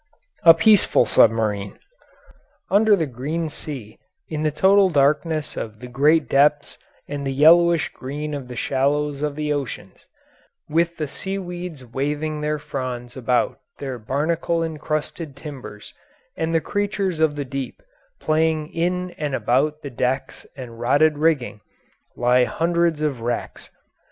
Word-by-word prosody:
A 165 -1 +8
PEACEFUL 205 +4 +4
SUBMARINE 105 -3 +2 0.9
Under 210 +1 +5
the 165 -5 0
green 150 +6 -3
sea, 135 -8 -9 0.3
in 155 -1 -3
the 155 - +2
total 190 +5 +4
darkness 150 +1 +1
of 110 -1 -6
the 125 - -8
great 145 +5 +3
depths 145 +1 +2 0.3
and 145 0 -5
the 135 - -2
yellowish 165 +4 +5
green 150 +3 -6
of 140 -3 -5
the 125 - -8
shallows 140 +3 0
of 150 -1 -2
the 150 0 -1
oceans, 140 -4 -6 0.6
with 170 +2 0
the 155 - -2
seaweeds 180 -5 -6
waving 145 +5 -3
their 150 0 -1
fronds 125 -4 -5
about 125 -1 0 0.2
their 130 -3 -5
barnacle 165 +8 -1
encrusted 155 -1 -4
timbers 140 -8 -10 0.4
and 160 0 -2
the 165 - +3
creatures 200 -3 -2
of 160 -2 +2
the 145 -1 -3
deep 135 0 -6 0.4
playing 155 0 0
in 180 +2 -1
and 145 -3 -1
about 150 +5 0
the 140 - -6
decks 125 +2 -2
and 120 -3 -9
rotted 145 +5 +3
rigging, 145 -9 +1 0.5
lie 125 +1 +3
hundreds 170 0 0
of 140 -6 -1
wrecks. 120 +1 -4
150 Hz, 135 wpm, -22 LUFS, 130-165 Hz, 0.9 s, A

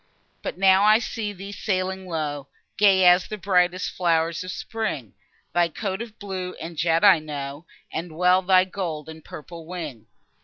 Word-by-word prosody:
But - - -5
now 190 0 +5
I 215 +1 +7
see 220 -2 -4
thee 200 0 -8
sailing 190 -1 -2
low, 150 -4 -3 0.3
Gay 195 -3 +5
as 180 +1 +6
the 215 - -5
brightest 185 -1 +1
flow'rs 165 -1 0
of 185 - -7
spring, 185 - -4 0.4
Thy 175 -1 +3
coat 190 +4 -4
of 230 -2 -8
blue 190 -3 -5
and 165 +1 -7
jet 165 +3 +1
I 195 -5 +7
know, 145 0 -6 0.3
And 160 -1 -5
well 180 +1 +4
thy 185 0 +4
gold 170 -6 -5
and 160 -1 -10
purple 165 +1 -10
wing. 155 -11 -7
180 Hz, 165 wpm, -24 LUFS, 160-190 Hz, 0.4 s, I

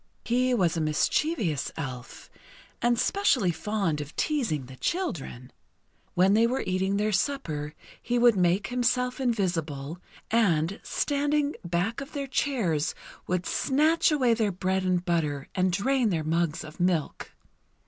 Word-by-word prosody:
He 250 +2 +2
was 180 -7 +2
a 165 - -1
mischievous 155 - 0
Elf, 130 -5 -7 0.5
and 240 0 +2
specially 255 - +2
fond 170 -3 -1
of 145 +1 -9
teasing 230 - -1
the 130 +1 -11
children. 140 - -3 0.6
When 185 +2 +4
they 225 +2 +4
were 255 +3 -1
eating 190 +2 0
their 210 +1 +1
supper, 165 - -2 0.3
he 245 - -1
would 240 -2 +5
make 185 +2 +2
himself 250 +1 0
invisible, 170 - -1 0.3
and, 195 -5 +2
standing 290 0 0
back 180 +8 -1
of 275 - -9
their 285 -2 -3
chairs, 190 - 0 0.3
would 180 0 -1
snatch 310 +5 +2
away 260 -6 +3
their 220 -3 +1
bread 190 +1 -1
and 180 -1 0
butter 150 -6 -1
and 185 -1 +1
drain 245 +5 +1
their 165 -5 -1
mugs 165 0 0
of 155 +2 -11
milk. 175 -4 -1
190 Hz, 140 wpm, -27 LUFS, 165-250 Hz, 0.6 s, would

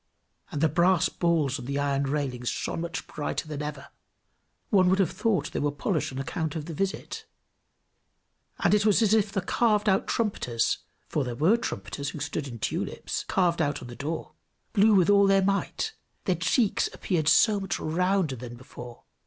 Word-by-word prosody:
And 145 - -3
the 160 - +5
brass 170 +3 +3
balls 155 -6 +1
on 125 - -8
the 140 +2 -2
iron 140 -1 0
railings 135 -4 -2
shone - - -3
much 170 -1 -4
brighter 150 +1 -4
than 150 -1 -5
ever; 150 0 -6 0.8
one 185 -4 +5
would 190 - +3
have 190 -5 +2
thought 205 -4 0
they - - -2
were 145 - +1
polished 150 +2 -1
on 130 - -7
account 155 +3 -3
of 155 -2 -4
the 165 - -6
visit; 195 +5 -3 1.3
and - - +2
it 210 -1 +4
was 215 +1 +4
as 215 -1 +3
if 215 -2 +3
the 195 - -1
carved 215 +2 +1
out 190 -1 +2
trumpeters 125 - 0 0.3
for 150 - -1
there 125 -2 -4
were 160 - +4
trumpeters, 145 -10 -4
who 150 - -7
stood 145 0 -3
in 120 -3 -7
tulips, - - -3
carved 175 -3 +1
out 145 -3 -1
on 120 - -9
the 120 - -8
door 155 +5 -5 0.4
blew 210 0 +5
with 180 -3 +5
all 200 -1 +6
their 195 0 +4
might, 200 - -1 0.3
their 185 - +2
cheeks 200 - +1
appeared 165 -6 -1
so 205 +6 +5
much 195 -2 -3
rounder 180 -2 +1
than 120 0 -8
before. 120 -1 -11
165 Hz, 185 wpm, -27 LUFS, 145-195 Hz, 1.3 s, all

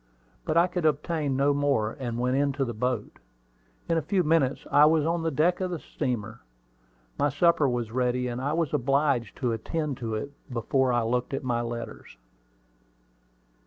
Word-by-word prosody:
But 155 - 0
I 170 - +6
could 180 -1 -3
obtain 150 -1 0
no 140 +1 +3
more, 140 -7 +1
and 120 -3 -3
went 125 +1 0
into 140 0 +1
the 120 - -4
boat. 120 0 -3 0.7
In 165 -1 +2
a - - -3
few 185 +4 +1
minutes 150 -4 +1
I 145 +1 +7
was 155 -1 +3
on 165 +1 0
the 165 - 0
deck 165 +5 +1
of 185 - -1
the 175 - -3
steamer. 115 -7 -4 0.8
My 145 - +3
supper 150 0 +3
was 120 -2 -2
all 120 - -5
ready, 125 0 +1
and 120 +1 -4
I 140 +3 -1
was 160 -2 -1
obliged 135 -4 +1
to 125 -4 -1
attend 145 +5 -3
to 115 -4 -3
it 125 +7 -4 0.2
before 125 +2 +1
I 120 -1 +2
looked 125 +3 -1
at - - -4
my 120 -2 0
letters. 115 - -7
135 Hz, 185 wpm, -27 LUFS, 120-155 Hz, 0.8 s, I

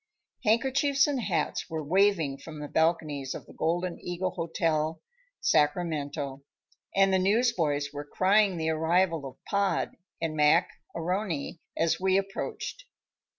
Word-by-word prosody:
Handkerchiefs 270 +5 +3
and 280 -4 -1
hats 180 -4 -1
were 160 -2 -3
waving 170 -4 +2
from 155 -2 -9
the 150 - -5
balconies 155 -4 0
of - - -8
the - - -15
Golden 175 +2 -1
Eagle 180 +1 -2
Hotel, 165 -2 -1 0.4
Sacramento, 145 -3 0 0.5
and 195 0 +5
newsboys 170 - +1
were 145 0 -5
crying 190 +5 +3
the 160 0 0
arrival 165 -1 +1
of 130 - -14
Pod 200 -1 0 0.2
and 160 -1 -2
Mac 150 0 +4 0.2
A'Rony 170 -2 -2 0.2
as 165 0 +2
we 190 0 +3
approached. 195 - -4
165 Hz, 125 wpm, -28 LUFS, 155-195 Hz, 0.5 s, and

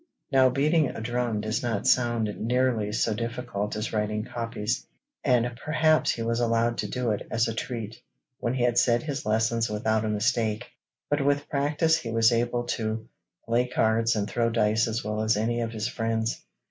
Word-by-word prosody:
Now 130 -1 +5
beating 150 +4 +2
a - - -6
drum 120 -1 -1
does 110 +2 -1
not 115 -5 -2
sound 120 -3 +3
nearly 120 -2 +1
so 110 +1 +1
difficult 115 -2 -3
as 105 +2 -3
writing 105 0 -1
copies, 115 -2 -3 0.4
and 125 -2 +2
perhaps 155 0 +3
he 115 - -1
was 115 +1 0
allowed 115 0 +1
to 105 - -1
do 125 +2 -1
it 105 - -3
as 115 0 +1
a 115 - -2
treat 115 -1 -5 0.4
when 120 +1 -1
he 125 - 0
had 120 -1 +3
said 120 -1 +2
his 145 -7 -4
lessons 115 +1 +1
without 110 +1 0
a 110 - -1
mistake, 110 +1 0 0.4
but 145 -1 +1
with 145 +1 +1
practice 150 +3 +2
he 115 - -6
was 115 +1 +4
able 120 +1 0
to 110 -1 -3 0.4
play 120 +2 +1
cards 115 -1 +2
and 105 -1 -1
throw 115 -1 0
dice 110 -1 +2
as 115 +2 -2
well 105 0 -2
as 110 0 +2
any 120 +2 0
of 115 -1 -2
his 110 -1 -2
friends. 115 0 -2
115 Hz, 185 wpm, -26 LUFS, 110-125 Hz, 0.4 s, Now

